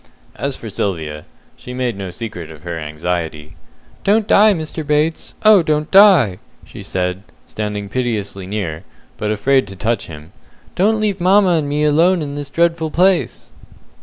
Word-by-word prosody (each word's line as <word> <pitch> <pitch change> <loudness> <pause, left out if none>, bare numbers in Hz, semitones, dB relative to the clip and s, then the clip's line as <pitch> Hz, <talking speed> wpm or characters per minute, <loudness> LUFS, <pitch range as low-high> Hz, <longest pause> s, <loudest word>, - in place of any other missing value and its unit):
As 140 -1 -3
for 115 - -9
Sylvia, 80 -7 -4 0.3
she 125 - -9
made 125 -3 -1
no 95 -1 -6
secret 90 -4 -7
of 75 -1 -14
her 85 -1 -5
anxiety. 75 0 -4 0.5
"Don't 210 +1 +2
die, 215 +1 +6
Mr. 160 -3 -4
Bates 150 +2 -1
oh, 215 -3 +7
don't 150 -1 -1
die!" 185 - +6 0.3
she - - -11
said, 90 0 -3 0.2
standing 105 -1 -4
piteously 105 -5 -3
near, 95 -5 -4 0.3
but 105 - -2
afraid 130 +3 +2
to 95 - -9
touch 110 +2 -2
him. 80 0 -11 0.4
"Don't 215 +4 +2
leave 205 -3 -1
mamma 190 +2 +4
and 155 -4 0
me 150 +1 0
alone 165 +4 +3
in 140 -1 -5
this 145 -1 -6
dreadful 165 0 +1
place!" 180 +3 +1
125 Hz, 160 wpm, -18 LUFS, -, 0.5 s, oh